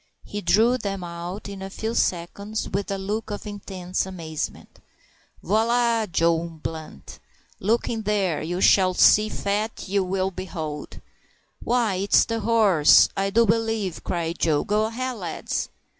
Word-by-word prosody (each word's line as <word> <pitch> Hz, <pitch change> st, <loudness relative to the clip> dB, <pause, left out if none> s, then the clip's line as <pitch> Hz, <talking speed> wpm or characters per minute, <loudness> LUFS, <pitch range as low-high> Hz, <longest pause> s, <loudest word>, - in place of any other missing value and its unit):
He 205 Hz, -, -6 dB
drew 235 Hz, +5 st, +3 dB
them 195 Hz, -4 st, -4 dB
out 175 Hz, +4 st, -6 dB
in 200 Hz, -1 st, -8 dB
a 195 Hz, -, -5 dB
few 220 Hz, +3 st, -4 dB
seconds, 200 Hz, +3 st, -1 dB
with 200 Hz, +1 st, -3 dB
a 195 Hz, -, -1 dB
look 210 Hz, +4 st, -3 dB
of 205 Hz, +1 st, -5 dB
intense 190 Hz, -3 st, -4 dB
amazement. 165 Hz, -5 st, -6 dB, 0.6 s
"Voilà! 230 Hz, 0 st, +1 dB
Joe 165 Hz, 0 st, +3 dB
Blunt. 160 Hz, -, -8 dB, 0.4 s
Look 225 Hz, +5 st, +1 dB
in 225 Hz, -1 st, -2 dB
dere, 200 Hz, -6 st, 0 dB
and 160 Hz, -, -5 dB
you 175 Hz, +1 st, -2 dB
shall 185 Hz, -2 st, +5 dB
see 210 Hz, +3 st, +6 dB
fat 210 Hz, +2 st, -2 dB
you 190 Hz, -1 st, 0 dB
vill 190 Hz, 0 st, 0 dB
behold." 165 Hz, -5 st, -6 dB, 0.6 s
"Why, 235 Hz, -6 st, +1 dB
it's 200 Hz, +2 st, +4 dB
the 230 Hz, 0 st, -2 dB
horse, 210 Hz, -8 st, +5 dB
I 195 Hz, 0 st, 0 dB
do 230 Hz, +4 st, +4 dB
b'lieve!" 225 Hz, -4 st, -1 dB
cried 170 Hz, -1 st, -3 dB
Joe. 155 Hz, -3 st, +2 dB
"Go 210 Hz, +1 st, +1 dB
ahead, 250 Hz, +2 st, -3 dB
lads!" 175 Hz, -5 st, -3 dB
195 Hz, 150 wpm, -24 LUFS, 180-220 Hz, 0.6 s, see